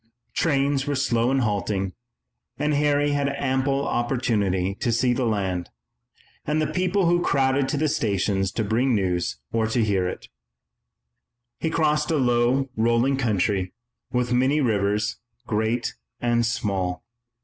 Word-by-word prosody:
Trains 140 -2 +1
were 145 - 0
slow 120 -3 +1
and 135 0 +2
halting, 100 -3 -1 0.6
and 150 0 0
Harry 145 0 +2
had 140 -1 +1
ample 135 0 0
opportunity 105 -7 0
to 120 - 0
see 120 +2 +2
the 125 -1 0
land 95 -5 -1 0.7
and 150 +1 0
the 155 - +1
people 185 +3 0
who 175 +1 +3
crowded 135 -3 +2
to 150 - -1
the 155 +2 +1
stations 100 -6 0
to 110 - -1
bring 115 +4 +1
news 90 -7 -1
or 110 -1 +1
to 115 +1 +1
hear 95 -4 +1
it. - - -6 1.3
He 160 - -1
crossed 150 -2 +1
a 160 - +2
low, 125 +1 +2
rolling 120 +4 +2
country 100 -6 0 0.4
with 125 0 0
many 130 +4 +3
rivers, 105 -4 0 0.3
great 110 +2 -1 0.3
and 120 -1 +1
small. 95 -5 -2
120 Hz, 140 wpm, -24 LUFS, 105-140 Hz, 1.3 s, who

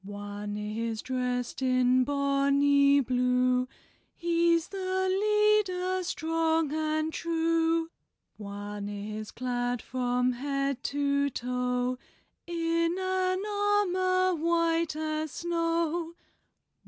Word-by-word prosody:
One 205 +1 -6
is 220 +2 -3
dressed 250 -1 -2
in 255 0 +3
bonny 280 0 +3
blue; 250 0 +1 0.5
He's 340 -1 +2
the 375 -1 -1
leader, 390 -2 +2
strong 325 -2 0
and 310 0 -1
true. 330 0 0 0.5
One 205 0 -6
is 210 +1 -6
clad 245 -1 -2
from 250 +1 0
head 275 +1 -2
to 280 0 +1
toe 250 0 -2 0.5
In 335 0 0
an 375 0 0
armor 370 -3 +2
white 335 -1 +1
as 310 0 -2
snow. 335 0 -1
290 Hz, 90 wpm, -28 LUFS, 250-340 Hz, 0.5 s, in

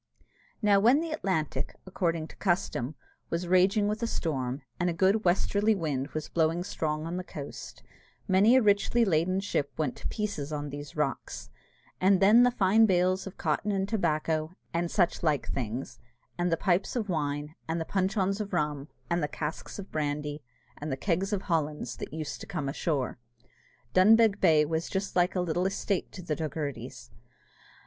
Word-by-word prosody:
Now 205 -1 +5
when 240 +8 +5
the 330 0 -3
Atlantic, 190 - -2
according 170 -4 -1
to - - -13
custom, 165 -7 -1 0.3
was 170 +1 -2
raging 190 +4 +4
with 210 +2 -2
a 230 - 0
storm, 135 - -2 0.2
and 180 0 +1
a - - -1
good 190 +5 +2
westerly 200 +4 +2
wind 145 -7 -2
was 155 -1 -3
blowing 165 +1 +1
strong 155 -5 -2
on 170 +2 -3
the 185 - -3
coast, 145 -5 -8 0.4
many 200 +6 +5
a 260 - +5
richly 210 +3 +3
laden 185 +1 +2
ship 145 -8 -1
went 150 -5 -1
to - - -4
pieces 200 -10 -3
on 145 -1 -4
these 145 0 -8
rocks; 120 - -3 0.5
and 190 0 +4
then 210 +5 +7
the 245 - +6
fine 220 -1 +4
bales 185 0 +2
of 190 - -9
cotton 165 +6 0
and 195 -1 0
tobacco, 160 -4 0 0.2
and 170 0 0
such 175 -2 +1
like 155 -4 +1
things, 125 0 -4 0.4
and 175 0 0
the 165 - +2
pipes 185 +4 +1
of 225 -4 -1
wine, 150 -3 -2
and 165 +1 -1
the 165 - -2
puncheons 195 +2 0
of 200 -2 -6
rum, 150 -4 -1 0.2
and 170 0 0
the 150 - 0
casks 150 +1 -5
of 200 -1 -8
brandy, 150 0 -2 0.4
and 150 0 -4
the 130 - -1
kegs 190 +5 0
of 200 -2 -1
Hollands 150 -6 -1
that - - -6
used 155 -2 -5
to - - -8
come 150 -6 -3
ashore! 135 -3 -2 0.7
Dunbeg 215 +2 +6
Bay 155 -4 +5
was 160 +2 -2
just 195 +1 -3
like 180 +1 +2
a 180 - +1
little 180 +1 0
estate 195 0 -2
to 185 - -8
the 155 -3 -1
Doghertys. 140 -6 -5
175 Hz, 180 wpm, -29 LUFS, 150-195 Hz, 0.7 s, then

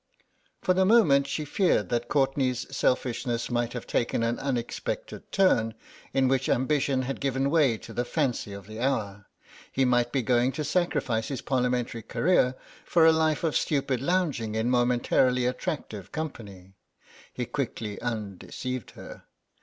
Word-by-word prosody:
For 185 - +3
the 190 +1 +3
moment 185 -10 +5
she 150 +2 -3
feared 145 - +1
that 120 0 -1
Courtenay's 135 -3 +1
selfishness 120 -1 0
might 120 -1 0
have 125 - -5
taken 115 -1 0
an 115 +1 0
unexpected 125 -4 -4
turn, 115 - +3 0.4
in 135 -1 +2
which 135 0 +1
ambition 130 0 +1
had 135 +2 -4
given 135 0 0
way 145 -8 +3
to - - -11
the 120 - 0
fancy 125 -5 -1
of 100 -1 -8
the 110 +1 -9
hour; 105 -6 -2 0.4
he 135 - +2
might 120 -1 +2
be 135 -1 0
going 125 +2 +2
to 155 - -3
sacrifice 140 -8 0
his 135 -3 -4
Parliamentary 125 -2 0
career 130 +2 +2 0.3
for 165 -2 +4
a 160 - +8
life 160 0 +1
of 160 -3 0
stupid 135 -4 0
lounging 140 -10 0
in 110 +2 0
momentarily 125 0 +2
attractive 125 - -4
company. 100 - -7 0.6
He - - -4
quickly 105 -2 -4
undeceived 115 +2 -4
her. - - -11
125 Hz, 150 wpm, -27 LUFS, 115-140 Hz, 0.6 s, a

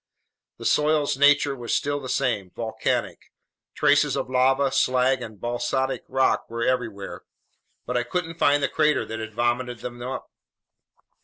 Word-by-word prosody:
The - - -9
soil's 150 -1 +2
nature 145 0 +4
was 120 -3 -2
still 145 -1 -1
the 130 -2 -7
same: 115 -10 0
volcanic. 115 -1 -3 0.4
Traces - - +3
of - - -3
lava, 135 +1 +3
slag, 130 -1 +2
and 110 -4 -8
basaltic 120 +2 -2
rock 130 0 +1
were 115 0 -3
everywhere, 115 -6 -2 0.6
but 125 - -3
I 125 - +3
couldn't 165 +6 -4
find 145 0 +3
the - - +3
crater 150 -1 +1
that 110 0 -6
had 110 -1 -7
vomited 120 0 -1
them 120 -1 -7
up. 130 +2 -6
130 Hz, 150 wpm, -24 LUFS, 120-140 Hz, 0.6 s, nature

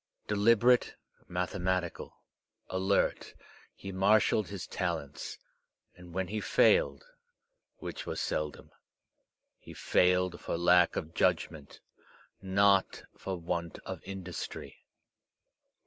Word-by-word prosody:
Deliberate, 115 +4 +4 0.3
mathematical, 90 0 -2 0.5
alert, 95 +1 0 0.4
he 95 - -8
marshalled 100 +2 +3
his 100 -3 -6
talents; 85 -6 -4 0.6
and 90 0 -13
when 95 +1 -2
he 105 +3 -3
failed, 485 0 +3 0.7
which - - -7
was - - -3
seldom, 75 -1 -3 0.9
he - - -12
failed 90 -1 +2
for - - -3
lack 90 +1 +4
of 80 +1 -4
judgment, 75 -3 -1 0.6
not 100 0 +2
for 95 -1 -5
want 85 -1 -3
of - - -6
industry. 95 -3 -7
95 Hz, 95 wpm, -31 LUFS, 85-100 Hz, 0.9 s, Deliberate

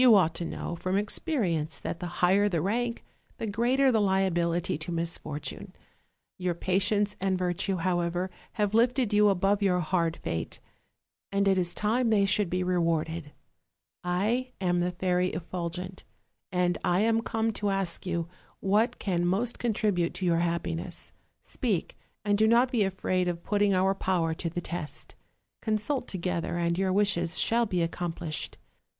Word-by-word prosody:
301 225 -7 +8
ought 160 - -4
to 170 - -4
know 170 - -4
from 185 +3 -1
experience 200 - -1
that 170 - -4
the 175 - -4 0.2
higher 200 +3 +4
the 170 -4 0
rank, 235 +7 -1 0.3
the - - -3
greater 245 +6 +3
the 220 -3 +3
liability 185 -2 +1
to 155 +3 -5
misfortune; 165 -3 -4 0.7
your 180 -1 0
pa 185 +2 +1
tience 205 0 +1
and 190 -1 +1
virtue, 180 +2 0
however, 175 +1 0 0.2
have 210 -1 0
lifted 235 0 +3
you 210 0 +6
above 195 +2 +2
your 185 -3 +3
hard 170 -1 0
fate; 80 0 -3 0.7
and 200 0 +2
it 195 - +5
is 175 -2 0
time 230 +3 +1
they 205 -3 +4
should 195 -1 +1
be 180 +1 0
rewarded. 165 -3 0 0.7
I 215 +9 0
am 175 -2 +1
the 175 +1 +1
Fairy 180 0 0
Effulgent, 180 +2 -5 0.5
and 180 -1 +1
I 180 +2 +2
am 225 +1 +3
come 225 -1 -1
to 205 0 -1
ask 195 -3 -1
you 170 -3 -2 0.3
what 210 +5 +2
can 175 -3 -1
most 200 +7 0
contribute 205 -7 0
to 185 - -3
your 170 -1 +3
happiness: 170 0 -2 0.3
speak, 210 - -2 0.3
and 205 0 +2
do 220 - +5
not 240 +3 +4
be 240 -5 +2
afraid 185 -2 0
of 170 -1 -3
putting 205 -1 +2
our 190 +1 +3
power 180 -4 0
to 165 +1 -3
the 175 +2 -4
test; 170 -3 -5 0.5
consult 225 +5 -1
together, 180 -2 -2
and 170 0 +1
your 190 +1 +1
wishes 185 -4 +1
shall 235 0 +3
be 180 -4 0
accomplished. 165 -2 -3
185 Hz, 160 wpm, -28 LUFS, 175-210 Hz, 0.7 s, 301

